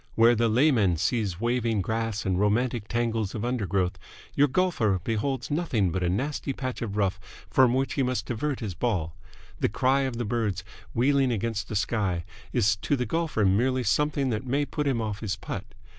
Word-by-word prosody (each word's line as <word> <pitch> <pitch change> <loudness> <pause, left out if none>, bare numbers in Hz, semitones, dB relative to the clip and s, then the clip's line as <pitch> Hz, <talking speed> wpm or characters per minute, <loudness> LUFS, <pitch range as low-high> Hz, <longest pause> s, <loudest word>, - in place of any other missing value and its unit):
Where 115 +1 +6
the 115 0 +2
layman 110 - +3
sees 100 -1 0
waving 115 -2 +1
grass 110 +1 -2
and 95 -1 +1
romantic 110 +2 +1
tangles 115 -3 -1
of 110 +1 -3
undergrowth, 100 -6 -1 0.3
your 145 - +4
golfer 130 - +1
beholds 125 +4 -2
nothing 130 - +1
but 95 - -2
a 90 - +1
nasty 135 +8 -1
patch 130 -1 -4
of 105 -3 -3
rough 95 -2 +1 0.3
from 130 -2 +5
which 135 -1 0
he 140 - 0
must 125 -4 0
divert 130 +3 -2
his 105 -5 -3
ball. 85 -6 -1 0.4
The - - +2
cry 130 +6 +2
of 130 -3 -2
the 120 - -2
birds, 105 -4 -1 0.3
wheeling 135 +2 +3
against 110 -2 -2
the 110 - -3
sky, 95 -5 0 0.3
is 105 +2 +2
to 145 - 0
the 125 -2 -1
golfer 160 -10 0
merely 125 +7 +2
something 140 0 +1
that 110 +1 -2
may 140 +3 0
put 150 0 -2
him 125 -4 +1
off 105 -1 -3
his 105 -3 -2
putt. 95 - -6
115 Hz, 190 wpm, -27 LUFS, 105-130 Hz, 0.4 s, Where